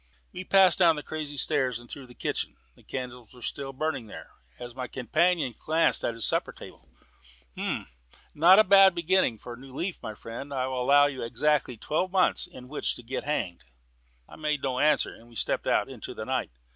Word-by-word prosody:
We 185 Hz, -, -6 dB
passed 190 Hz, 0 st, +5 dB
down 170 Hz, -3 st, +5 dB
the 150 Hz, -, -6 dB
crazy 150 Hz, -2 st, -6 dB
stairs 130 Hz, -2 st, +1 dB
and 120 Hz, 0 st, -13 dB
through 135 Hz, +1 st, -9 dB
the 125 Hz, -, -16 dB
kitchen. -, -, -3 dB, 0.2 s
The -, -, -22 dB
candles 125 Hz, -2 st, -7 dB
were 125 Hz, -, -14 dB
still 135 Hz, +2 st, -4 dB
burning 135 Hz, -4 st, -3 dB
there. -, -, -11 dB, 0.3 s
As 120 Hz, -1 st, -8 dB
my 130 Hz, 0 st, -5 dB
companion 155 Hz, +3 st, +1 dB
glanced 160 Hz, +6 st, +2 dB
at 115 Hz, -, -1 dB
the 115 Hz, -, -7 dB
supper -, -, +2 dB
table, -, -, -14 dB, 0.6 s
"H'm," -, -, -3 dB
he -, -, -30 dB
said, -, -, -25 dB
"not 175 Hz, +5 st, +7 dB
a 215 Hz, -, +8 dB
bad 195 Hz, -2 st, +6 dB
beginning 170 Hz, -6 st, +2 dB
of 110 Hz, -, -22 dB
a 120 Hz, -, -6 dB
new 130 Hz, +1 st, -13 dB
leaf. 175 Hz, +4 st, -4 dB
My 110 Hz, -, -6 dB
friend, 115 Hz, +7 st, -8 dB
I 130 Hz, -2 st, -1 dB
will 130 Hz, -1 st, -3 dB
allow 145 Hz, +3 st, +5 dB
you 140 Hz, -2 st, -3 dB
exactly 135 Hz, +1 st, 0 dB
twelve 165 Hz, -, -1 dB
months 185 Hz, -1 st, +2 dB
in 125 Hz, 0 st, -12 dB
which 145 Hz, +3 st, -1 dB
to 120 Hz, -, -10 dB
get 130 Hz, +3 st, -5 dB
hanged." 90 Hz, -, -3 dB, 0.6 s
I -, -, -13 dB
made 150 Hz, -2 st, -2 dB
no 130 Hz, -2 st, -1 dB
answer, 150 Hz, 0 st, +2 dB
and 115 Hz, +1 st, -17 dB
we 120 Hz, -, -17 dB
stepped -, -, -1 dB
out -, -, +2 dB
into -, -, -8 dB
the -, -, -6 dB
night. -, -, -2 dB
135 Hz, 215 wpm, -27 LUFS, 125-155 Hz, 0.6 s, a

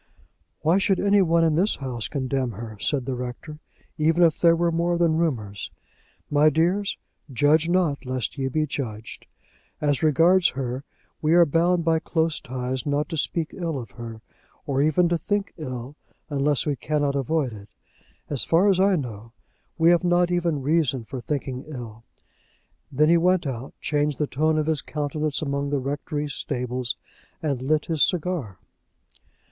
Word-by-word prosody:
"Why 170 Hz, +5 st, +3 dB
should 195 Hz, -2 st, +2 dB
any 200 Hz, 0 st, +4 dB
one 170 Hz, -2 st, +3 dB
in 160 Hz, -1 st, +3 dB
this 185 Hz, +7 st, +2 dB
house 125 Hz, -5 st, -4 dB
condemn 130 Hz, -3 st, -2 dB
her," 110 Hz, +2 st, -7 dB
said 135 Hz, +1 st, 0 dB
the 135 Hz, -, -2 dB
Rector, 125 Hz, +5 st, -6 dB, 0.4 s
"even 165 Hz, +3 st, +3 dB
if 165 Hz, -2 st, +3 dB
there 170 Hz, -1 st, +5 dB
were 170 Hz, 0 st, +1 dB
more 170 Hz, +1 st, +1 dB
than 170 Hz, -2 st, +2 dB
rumours? 110 Hz, -, -2 dB, 0.6 s
My 150 Hz, +1 st, +4 dB
dears, 175 Hz, +7 st, +1 dB, 0.3 s
judge 150 Hz, +5 st, +3 dB
not, 175 Hz, -6 st, +1 dB
lest 130 Hz, -3 st, -3 dB
ye 135 Hz, -2 st, -2 dB
be 155 Hz, +4 st, 0 dB
judged. 115 Hz, -7 st, -6 dB, 0.5 s
As 145 Hz, -3 st, +1 dB
regards 165 Hz, +4 st, +4 dB
her, 130 Hz, 0 st, -3 dB, 0.4 s
we 155 Hz, +2 st, +3 dB
are 175 Hz, -1 st, +7 dB
bound 170 Hz, +2 st, +2 dB
by 165 Hz, -1 st, +3 dB
close 160 Hz, -1 st, 0 dB
ties 130 Hz, 0 st, -3 dB
not 145 Hz, +1 st, 0 dB
to 165 Hz, -, -3 dB
speak 160 Hz, +2 st, -1 dB
ill 165 Hz, -5 st, -3 dB
of 115 Hz, -6 st, -7 dB
her 115 Hz, +2 st, -9 dB, 0.4 s
or 140 Hz, -1 st, 0 dB
even 155 Hz, +4 st, +3 dB
to 170 Hz, -1 st, +1 dB
think 205 Hz, 0 st, -2 dB
ill, 130 Hz, -3 st, -6 dB, 0.4 s
unless 145 Hz, 0 st, +1 dB
we 145 Hz, -2 st, 0 dB
cannot 145 Hz, -1 st, -1 dB
avoid 140 Hz, -1 st, 0 dB
it. 100 Hz, -1 st, -11 dB, 0.6 s
As 140 Hz, -4 st, 0 dB
far 180 Hz, +5 st, +3 dB
as 190 Hz, -2 st, +3 dB
I 195 Hz, 0 st, +4 dB
know, 115 Hz, -, -6 dB, 0.4 s
we 165 Hz, +1 st, +5 dB
have 175 Hz, +1 st, +3 dB
not 175 Hz, 0 st, +3 dB
even 175 Hz, -2 st, +1 dB
any 140 Hz, -, -5 dB
reason 145 Hz, -4 st, +1 dB
for 125 Hz, +2 st, -7 dB
thinking 135 Hz, -1 st, -3 dB
ill." 115 Hz, -6 st, -8 dB, 0.9 s
Then 150 Hz, +3 st, +3 dB
he 170 Hz, -, +6 dB
went 180 Hz, 0 st, +2 dB
out, 130 Hz, -1 st, -5 dB
changed 150 Hz, -1 st, 0 dB
the 150 Hz, -, +1 dB
tone 155 Hz, +3 st, +1 dB
of 155 Hz, -, +1 dB
his 155 Hz, -3 st, +2 dB
countenance 150 Hz, +1 st, -2 dB
among 140 Hz, -1 st, -2 dB
the 145 Hz, -, 0 dB
rectory 145 Hz, +2 st, -3 dB
stables, 125 Hz, -3 st, -3 dB, 0.5 s
and 140 Hz, -5 st, -1 dB
lit 150 Hz, +3 st, +1 dB
his 160 Hz, -3 st, -1 dB
cigar. 165 Hz, -, 0 dB
150 Hz, 170 wpm, -24 LUFS, 130-165 Hz, 0.9 s, are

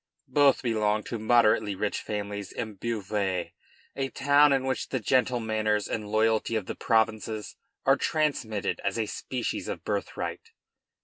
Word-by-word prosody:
Both 145 Hz, -2 st, +5 dB
belonged 105 Hz, -3 st, +1 dB
to 115 Hz, -, -3 dB
moderately 110 Hz, -3 st, +3 dB
rich 100 Hz, +2 st, -1 dB
families 100 Hz, -2 st, -4 dB
in 110 Hz, -2 st, -5 dB
Beauvais, 100 Hz, -3 st, -2 dB, 0.4 s
a 135 Hz, -1 st, -2 dB
town 145 Hz, +2 st, +4 dB
in 135 Hz, -1 st, +2 dB
which 130 Hz, -1 st, -2 dB
the 130 Hz, -, -1 dB
gentle 125 Hz, +2 st, +2 dB
manners 110 Hz, -2 st, 0 dB
and 105 Hz, -2 st, -4 dB
loyalty 110 Hz, +1 st, +2 dB
of 110 Hz, -4 st, -1 dB
the -, -, -4 dB
provinces 110 Hz, -1 st, 0 dB, 0.3 s
are -, -, +5 dB
transmitted 120 Hz, -10 st, -1 dB
as 100 Hz, +2 st, -1 dB
a 115 Hz, -, 0 dB
species 125 Hz, +3 st, -4 dB
of -, -, -5 dB
birthright. -, -, -4 dB
110 Hz, 145 wpm, -28 LUFS, 105-125 Hz, 0.4 s, Both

